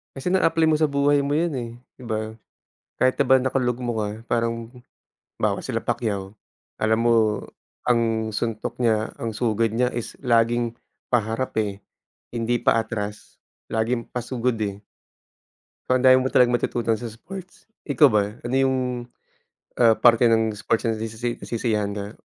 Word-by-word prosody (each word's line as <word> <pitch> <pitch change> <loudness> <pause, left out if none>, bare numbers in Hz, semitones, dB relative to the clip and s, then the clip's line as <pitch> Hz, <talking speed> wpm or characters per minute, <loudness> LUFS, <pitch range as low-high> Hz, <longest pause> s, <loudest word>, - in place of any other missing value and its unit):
Kasi 135 +7 -2
na-apply 165 -3 +3
mo 155 - +3
sa 155 - +4
buhay 140 0 +2
mo 145 +1 0
’yan, 165 -1 +1
eh, 120 -1 -4 0.3
’di 125 - -10
ba? 110 0 -3 0.6
Kahit 130 0 +3
na 140 - +4
ba 130 - +6
nakalugmok 125 -2 -1
ka, 105 -1 -1 0.2
parang 115 -1 -1 0.7
'bawa - - 0
sila - - -2
Pacquiao. 100 -3 -2 0.5
Alam 110 +1 +2
mo, 120 - +4 0.7
ang 115 -2 +1
suntok 110 +2 -3
niya, 110 -3 +1
ang 115 - -2
sugod 115 -1 +1
niya, 125 +2 +1
is 120 -1 -5
laging 115 0 +2 0.4
paharap, 115 +2 0
eh, 100 -2 -3 0.5
hindi 120 0 0
pa 115 - +3
atras. 105 -2 -6 0.3
Laging 115 +2 -1
pasugod, 125 0 -2
eh. 100 -1 -3 1.1
O, 130 - +3
ang 130 - 0
dami 130 0 +8
mo 130 - 0
talagang 120 -1 +5
matututunan 115 -2 -1
sa 120 - -6
sports. 185 - -11 0.2
Ikaw 145 0 +5
ba? 105 -2 +2 0.2
Ano 120 +2 -2
yung, 135 -1 +2 1.0
ah, 115 -2 +6
parte 120 0 +5
ng 115 -1 +3
sports 115 +2 0
na 110 - -1
nasisi 115 +2 -4
nasisiyahan 105 -3 -2
ka? 100 +1 -6
115 Hz, 155 wpm, -23 LUFS, 110-125 Hz, 1.1 s, dami